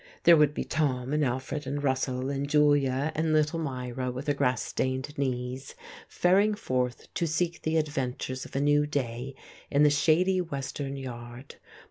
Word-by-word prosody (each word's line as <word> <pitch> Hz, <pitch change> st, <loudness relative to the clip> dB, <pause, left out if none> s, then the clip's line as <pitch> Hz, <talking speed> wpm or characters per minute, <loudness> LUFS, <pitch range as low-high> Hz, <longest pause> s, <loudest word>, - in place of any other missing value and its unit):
There 170 Hz, 0 st, +8 dB
would 150 Hz, -1 st, +3 dB
be -, -, -1 dB
Tom 135 Hz, -3 st, -1 dB
and 150 Hz, 0 st, +2 dB
Alfred 130 Hz, +3 st, -2 dB
and 145 Hz, +1 st, -3 dB
Russell 130 Hz, -1 st, 0 dB
and 140 Hz, 0 st, -2 dB
Julia 145 Hz, -1 st, +3 dB
and 160 Hz, +1 st, 0 dB
little 155 Hz, +2 st, +2 dB
Myra 125 Hz, -3 st, -3 dB
with 130 Hz, +3 st, -5 dB
her 145 Hz, -, +2 dB
grass 125 Hz, -5 st, +1 dB
stained 130 Hz, +3 st, -2 dB
knees, 130 Hz, -2 st, -3 dB, 0.3 s
faring 200 Hz, +4 st, +3 dB
forth 125 Hz, -, -2 dB
to 170 Hz, -, 0 dB
seek 170 Hz, +2 st, -1 dB
the 160 Hz, +1 st, 0 dB
adventures 130 Hz, -4 st, -2 dB
of -, -, -11 dB
a -, -, +1 dB
new 145 Hz, +1 st, +3 dB
day 130 Hz, -2 st, -3 dB, 0.3 s
in 145 Hz, +1 st, +3 dB
the 150 Hz, -, +6 dB
shady 175 Hz, +6 st, +3 dB
western 140 Hz, -3 st, -4 dB
yard. 120 Hz, 0 st, -8 dB
140 Hz, 165 wpm, -28 LUFS, 130-150 Hz, 0.3 s, There